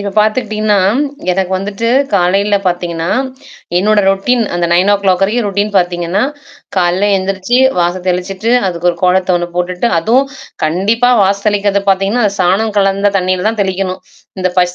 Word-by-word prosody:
இப்ப 200 Hz, 0 st, -3 dB
பார்த்துக்கிட்டீங்கன்னா, 215 Hz, -2 st, +1 dB, 0.5 s
எனக்கு 185 Hz, 0 st, -1 dB
வந்துட்டு 205 Hz, +4 st, -3 dB, 0.2 s
காலையில 200 Hz, +2 st, +2 dB
பார்த்தீங்கன்னா, 170 Hz, -1 st, -2 dB, 0.7 s
என்னோட 210 Hz, +2 st, +2 dB
ரொட்டீன் 225 Hz, +5 st, +1 dB
அந்த 175 Hz, 0 st, 0 dB
9 185 Hz, +4 st, +3 dB
ஓ -, -, +5 dB
கிளாக் 190 Hz, -1 st, +2 dB
வரைக்கும் 215 Hz, +2 st, 0 dB
ரொட்டீன் 205 Hz, +1 st, -1 dB
பார்த்தீங்கன்னா, 175 Hz, +2 st, 0 dB, 0.5 s
காலைல 185 Hz, +3 st, +1 dB
எழுந்திரிச்சு 190 Hz, +5 st, -1 dB, 0.2 s
வாச 175 Hz, +1 st, 0 dB
தெளிச்சுட்டு 190 Hz, +5 st, -2 dB, 0.2 s
அதுக்கு 175 Hz, 0 st, -1 dB
ஒரு 170 Hz, -, -7 dB
கோலத்த 185 Hz, 0 st, +2 dB
ஒண்ணு 175 Hz, 0 st, -3 dB
போட்டுட்டு 180 Hz, +5 st, -1 dB
அதுவும் 245 Hz, +10 st, +2 dB, 0.4 s
கண்டிப்பா 210 Hz, +10 st, +1 dB
வாச 195 Hz, +1 st, +2 dB
தெளிக்கிறது 200 Hz, -1 st, 0 dB
பார்த்தீங்கன்னா, 195 Hz, +5 st, +1 dB
அந்த 200 Hz, -, -2 dB
சாணம் 200 Hz, +4 st, +1 dB
கலந்த 195 Hz, +1 st, +2 dB
தண்ணீயில 185 Hz, +1 st, -1 dB
தான் 220 Hz, -2 st, -2 dB
தெளிக்கணும். 190 Hz, -1 st, -3 dB, 0.4 s
இந்த 185 Hz, -, 0 dB
பஷ 180 Hz, 0 st, +1 dB
195 Hz, 150 wpm, -13 LUFS, 180-205 Hz, 0.7 s, ஓ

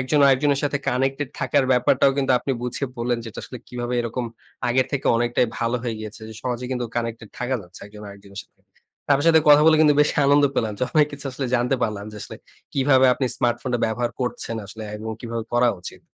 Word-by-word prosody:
একজন 145 Hz, +3 st, +1 dB
আরেকজনের 140 Hz, +1 st, +3 dB
সাথে 145 Hz, 0 st, 0 dB
কানেক্টেড 135 Hz, +2 st, 0 dB
থাকার 140 Hz, -2 st, +2 dB
ব্যাপারটাও 125 Hz, +2 st, +4 dB
কিন্তু 135 Hz, -1 st, +2 dB
আপনি 135 Hz, +2 st, -2 dB
বুঝিয়ে 125 Hz, +2 st, -3 dB
বললেন, 120 Hz, 0 st, 0 dB
যে -, -, -6 dB
এটা -, -, -8 dB
আসলে 125 Hz, -, -9 dB
কিভাবে 120 Hz, 0 st, -4 dB
এরকম 120 Hz, +1 st, -3 dB, 0.4 s
আগের 130 Hz, +1 st, +2 dB
থেকে 140 Hz, -, -2 dB
অনেকটাই 120 Hz, +1 st, +1 dB
ভালো 115 Hz, +1 st, 0 dB
হয়ে 120 Hz, -2 st, -2 dB
গিয়েছে। 110 Hz, +1 st, -8 dB, 0.2 s
সহজে 125 Hz, 0 st, -3 dB
কিন্তু 125 Hz, -1 st, -2 dB
কানেক্টেড 115 Hz, -2 st, -3 dB
থাকা 125 Hz, +1 st, -1 dB
যাচ্ছে 90 Hz, +1 st, -14 dB
একজন 105 Hz, 0 st, -12 dB
আরেকজনের 100 Hz, 0 st, -10 dB
সাথে। -, -, -36 dB, 0.5 s
আপনার 145 Hz, +4 st, +2 dB
সাথে 160 Hz, -1 st, +6 dB
কথা 145 Hz, +1 st, +8 dB
বলে 160 Hz, -1 st, +6 dB
কিন্তু 150 Hz, -2 st, +5 dB
বেশি -, -, 0 dB
আনন্দ 145 Hz, +1 st, +5 dB
পেলাম। 110 Hz, -2 st, 0 dB
য -, -, -1 dB
অনেক 150 Hz, -2 st, +5 dB
কিছু 145 Hz, 0 st, -8 dB
আসলে 130 Hz, 0 st, -3 dB
জানতে 125 Hz, +2 st, +1 dB
পারলাম 100 Hz, -2 st, -2 dB
যে -, -, -9 dB
আসলে -, -, -8 dB, 0.4 s
কিভাবে 135 Hz, -1 st, +4 dB
আপনি 130 Hz, -, -1 dB
স্মার্টফোনটা 120 Hz, +1 st, 0 dB
ব্যবহার 120 Hz, +2 st, -1 dB
করছেন 120 Hz, -2 st, -3 dB
আসলে 110 Hz, +2 st, -9 dB
এবং 110 Hz, +1 st, -6 dB
কিভাবে 115 Hz, -1 st, -4 dB
করা 120 Hz, 0 st, +4 dB
উচিত। -, -, -9 dB
125 Hz, 205 wpm, -23 LUFS, 115-135 Hz, 0.5 s, কথা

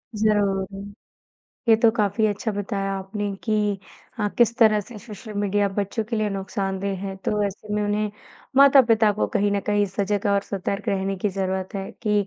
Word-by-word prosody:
ज़रूर। 205 Hz, -3 st, +1 dB, 1.0 s
ये 225 Hz, -, +8 dB
तो 225 Hz, 0 st, +5 dB
काफ़ी 210 Hz, 0 st, +2 dB
अच्छा 210 Hz, +2 st, -1 dB
बताया 195 Hz, -1 st, -2 dB
आपने 200 Hz, +2 st, -4 dB
कि 210 Hz, -2 st, +1 dB, 0.4 s
हाँ, 210 Hz, -2 st, 0 dB
किस 235 Hz, -1 st, +4 dB
तरह 215 Hz, -2 st, +5 dB
से 215 Hz, +2 st, -11 dB
सोशल 215 Hz, 0 st, -10 dB
मीडिया 205 Hz, 0 st, +1 dB
बच्चों 205 Hz, +2 st, -1 dB
के 225 Hz, +2 st, -3 dB
लिए 215 Hz, -1 st, 0 dB
नुकसानदेह 195 Hz, 0 st, -3 dB
हैं 195 Hz, 0 st, -5 dB
तो 210 Hz, 0 st, +1 dB
ऐसे 210 Hz, +1 st, -7 dB
में 210 Hz, -, 0 dB
उन्हें 210 Hz, 0 st, 0 dB, 0.5 s
माता-पिता 245 Hz, -6 st, +6 dB
को 205 Hz, -, 0 dB
कहीं 205 Hz, -1 st, +2 dB
न 200 Hz, -, +1 dB
कहीं 205 Hz, 0 st, +2 dB
सजग 200 Hz, +2 st, -1 dB
और 200 Hz, 0 st, +3 dB
सतर्क 200 Hz, +1 st, -4 dB
रहने 195 Hz, 0 st, 0 dB
की 200 Hz, +3 st, -1 dB
ज़रूरत 190 Hz, 0 st, -3 dB
है 195 Hz, -1 st, -4 dB
कि 210 Hz, -3 st, +1 dB
205 Hz, 175 wpm, -24 LUFS, 195-215 Hz, 1.0 s, ये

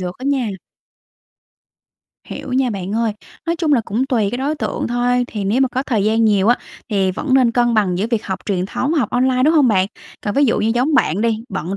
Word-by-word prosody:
được 180 Hz, +2 st, -5 dB
á 260 Hz, -, -8 dB
nha. 260 Hz, -5 st, 0 dB, 1.8 s
Hiểu 255 Hz, -, -7 dB
nha 255 Hz, -1 st, +1 dB
bạn 195 Hz, -1 st, -4 dB
ơi. 225 Hz, -2 st, 0 dB, 0.3 s
Nói 335 Hz, 0 st, 0 dB
chung 320 Hz, -3 st, 0 dB
là 250 Hz, -, +4 dB
cũng 240 Hz, +7 st, -1 dB
tùy 225 Hz, -6 st, +1 dB
cái 245 Hz, -, -3 dB
đối 285 Hz, +4 st, -1 dB
tượng -, -, -3 dB
thôi, 245 Hz, +1 st, +1 dB
thì 210 Hz, -4 st, -5 dB
nếu 220 Hz, +7 st, +1 dB
mà 265 Hz, -, +3 dB
có 260 Hz, +2 st, -2 dB
thời 220 Hz, -7 st, 0 dB
gian 225 Hz, +1 st, +2 dB
nhiều 205 Hz, -1 st, +3 dB
á 245 Hz, -, +5 dB, 0.3 s
thì 195 Hz, -2 st, +1 dB
vẫn 260 Hz, +7 st, -1 dB
nên 255 Hz, -3 st, +4 dB
cân 240 Hz, -1 st, +2 dB
bằng 185 Hz, -4 st, +1 dB
giữa 210 Hz, -, 0 dB
việc 230 Hz, -3 st, -1 dB
học 190 Hz, -1 st, -3 dB
truyền 185 Hz, -2 st, -1 dB
thống, 275 Hz, +8 st, -2 dB
học 275 Hz, -10 st, 0 dB
online, 255 Hz, 0 st, +2 dB
đúng 315 Hz, +4 st, +4 dB
hông 285 Hz, -5 st, +5 dB
bạn? 190 Hz, -3 st, +3 dB, 0.3 s
Còn 205 Hz, -, -3 dB
ví 285 Hz, +1 st, +4 dB
dụ 230 Hz, -, +2 dB
như 220 Hz, -, +1 dB
giống 270 Hz, +5 st, +1 dB
bạn 195 Hz, -, +2 dB
đi, 230 Hz, -1 st, +1 dB
bận 180 Hz, +1 st, -4 dB
235 Hz, 240 wpm, -19 LUFS, 205-260 Hz, 1.8 s, á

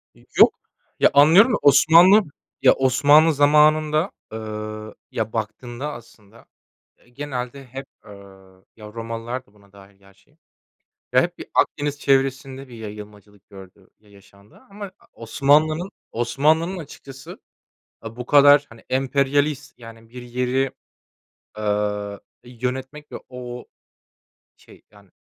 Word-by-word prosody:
E, -, -, -22 dB, 0.2 s
yok. -, -, +7 dB, 0.5 s
Ya, -, -, +5 dB
anlıyorum 165 Hz, -, +6 dB
da -, -, +2 dB
Osmanlı 165 Hz, +8 st, +6 dB, 0.4 s
ya, -, -, +6 dB
Osmanlı 145 Hz, +5 st, +4 dB
zamanında, 155 Hz, +3 st, +3 dB, 0.2 s
eee, 110 Hz, -, -6 dB, 0.7 s
ya, 110 Hz, -1 st, -4 dB
baktığında 120 Hz, +6 st, -5 dB
aslında, 115 Hz, -1 st, -16 dB, 0.5 s
eee, 120 Hz, -, -27 dB
genelde 135 Hz, 0 st, -6 dB
hep, 135 Hz, +2 st, -9 dB, 0.2 s
eee, -, -, -13 dB, 0.6 s
ya, 105 Hz, -1 st, -13 dB
Romalılar 115 Hz, +2 st, -6 dB
da 100 Hz, -, -29 dB
buna 100 Hz, -1 st, -24 dB
dâhil 100 Hz, 0 st, -18 dB
gerçi, 100 Hz, +9 st, -26 dB, 0.8 s
ya, -, -, +5 dB
hep -, -, -4 dB
bir -, -, -9 dB
Akdeniz 145 Hz, 0 st, 0 dB
çevresinde 135 Hz, 0 st, -1 dB
bir 120 Hz, -, -13 dB
yayılmacılık 105 Hz, -1 st, -12 dB
gördü, 95 Hz, 0 st, -15 dB
ya 105 Hz, -1 st, -26 dB
yaşandı. 100 Hz, +1 st, -21 dB
Ama 200 Hz, -1 st, -9 dB, 0.2 s
Osmanlı'nın 150 Hz, -, +1 dB, 0.2 s
Osmanlı'nın 155 Hz, +10 st, 0 dB
açıkçası, 135 Hz, -4 st, -11 dB, 0.6 s
aaa, 115 Hz, +1 st, -10 dB
bu 125 Hz, 0 st, -7 dB
kadar, 145 Hz, 0 st, +6 dB
hani, 115 Hz, -1 st, -17 dB
emperyalist, 140 Hz, +2 st, -1 dB
yani, 115 Hz, -1 st, -14 dB
bir 125 Hz, 0 st, -10 dB
yeri, 125 Hz, +2 st, -2 dB, 0.9 s
ııı, 105 Hz, -1 st, -2 dB, 0.2 s
yönetmek 130 Hz, +4 st, -6 dB
ve -, -, -5 dB
o, 125 Hz, -1 st, -9 dB, 0.9 s
şey, -, -, -20 dB
yani, 100 Hz, -2 st, -21 dB
125 Hz, 120 wpm, -21 LUFS, 110-145 Hz, 0.9 s, yok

